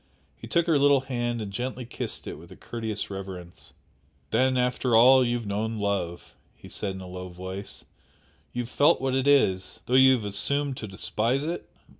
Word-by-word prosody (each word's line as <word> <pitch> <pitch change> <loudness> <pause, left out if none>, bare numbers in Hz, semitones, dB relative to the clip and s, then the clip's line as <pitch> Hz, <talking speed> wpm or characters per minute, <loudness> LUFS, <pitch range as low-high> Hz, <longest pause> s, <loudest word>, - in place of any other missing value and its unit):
He - - -11
took 170 -1 +2
her 160 -4 +3
little 140 -1 +5
hand 120 -3 -2
and 100 -2 -6
gently 125 +2 -4
kissed - - -5
it - - -5
with - - -14
courteous 110 -3 -5
reverence. 95 -3 -9 0.6
"Then 130 0 +2
after 125 -1 +1
all 130 +3 +7
you 120 0 0
have 115 - -7
known 110 +3 -2
love!" 95 -4 -3 0.2
he - - -14
said 95 -2 -4
in 95 - -8
a 90 - -8
low 90 0 -7
voice 95 +3 -8 0.7
"You 120 - -2
have 115 - -10
felt 145 +2 +4
what 130 0 -1
it 130 +1 +1
is, 95 -10 +2
though 125 - -3
you 130 0 +7
have 110 -4 -4
assumed 135 +8 0
to 110 - -6
despise 115 +7 -1
it?" 170 +3 -4
120 Hz, 190 wpm, -26 LUFS, 100-130 Hz, 0.7 s, all